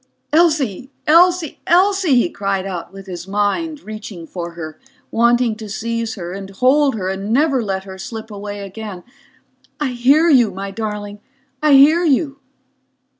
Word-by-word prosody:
"Elsie, 290 Hz, -, +2 dB
Elsie, 345 Hz, 0 st, +4 dB
Elsie," 370 Hz, -3 st, +3 dB
he 240 Hz, -, +3 dB
cried 195 Hz, -, -2 dB
out 180 Hz, -3 st, -5 dB
with 195 Hz, 0 st, -11 dB
his 180 Hz, -1 st, -7 dB
mind, 210 Hz, -, -1 dB
reaching 215 Hz, -5 st, -8 dB
for 170 Hz, 0 st, -6 dB
her, 160 Hz, -2 st, -8 dB, 0.3 s
wanting 235 Hz, 0 st, +3 dB
to 215 Hz, -1 st, -9 dB
seize 230 Hz, +2 st, -3 dB
her 175 Hz, -3 st, -6 dB
and 195 Hz, 0 st, -7 dB
hold 260 Hz, +7 st, +3 dB
her 190 Hz, -4 st, -3 dB
and 195 Hz, +2 st, -3 dB
never 275 Hz, +1 st, +2 dB
let 190 Hz, -3 st, -3 dB
her 190 Hz, -1 st, -10 dB
slip 220 Hz, +3 st, -7 dB
away 205 Hz, 0 st, -6 dB
again. 200 Hz, -2 st, -8 dB, 0.8 s
"I 295 Hz, -3 st, 0 dB
hear 265 Hz, +7 st, +3 dB
you, 255 Hz, -8 st, +5 dB
my 195 Hz, +1 st, -6 dB
darling. 210 Hz, -1 st, -5 dB, 0.4 s
I 305 Hz, -1 st, +4 dB
hear 300 Hz, +6 st, +6 dB
you!" 280 Hz, -2 st, +1 dB
220 Hz, 155 wpm, -19 LUFS, 195-280 Hz, 0.8 s, hear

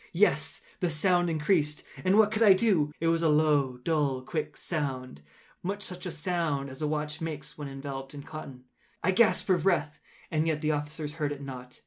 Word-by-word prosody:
Yet 150 Hz, -6 st, +2 dB, 0.2 s
the 175 Hz, -, +1 dB
sound 175 Hz, +2 st, +2 dB
increased—and 155 Hz, +2 st, +1 dB
what 215 Hz, -1 st, +6 dB
could 215 Hz, +1 st, -1 dB
I 210 Hz, -4 st, +9 dB
do? 185 Hz, -7 st, +2 dB
It 165 Hz, -, -2 dB
was 165 Hz, 0 st, +3 dB
a 165 Hz, -, +3 dB
low, 150 Hz, -4 st, +3 dB
dull, 140 Hz, -2 st, 0 dB
quick 155 Hz, +3 st, -4 dB
sound—much 140 Hz, -, -5 dB
such 180 Hz, -1 st, -6 dB
a -, -, -2 dB
sound 160 Hz, -4 st, -1 dB
as 130 Hz, -, -10 dB
a 150 Hz, -, +1 dB
watch 150 Hz, 0 st, -2 dB
makes 150 Hz, -3 st, -5 dB
when 145 Hz, -2 st, -6 dB
enveloped 135 Hz, 0 st, -6 dB
in 140 Hz, -, -7 dB
cotton. 145 Hz, -5 st, -9 dB, 0.4 s
I 185 Hz, -, +3 dB
gasped 215 Hz, +4 st, +4 dB
for 185 Hz, -3 st, +3 dB
breath—and 155 Hz, -2 st, -1 dB
yet 155 Hz, -2 st, 0 dB
the 155 Hz, -1 st, +1 dB
officers 150 Hz, 0 st, -3 dB
heard 150 Hz, -2 st, -2 dB
it 140 Hz, -1 st, -6 dB
not. 125 Hz, -2 st, -8 dB
150 Hz, 180 wpm, -29 LUFS, 140-175 Hz, 0.4 s, I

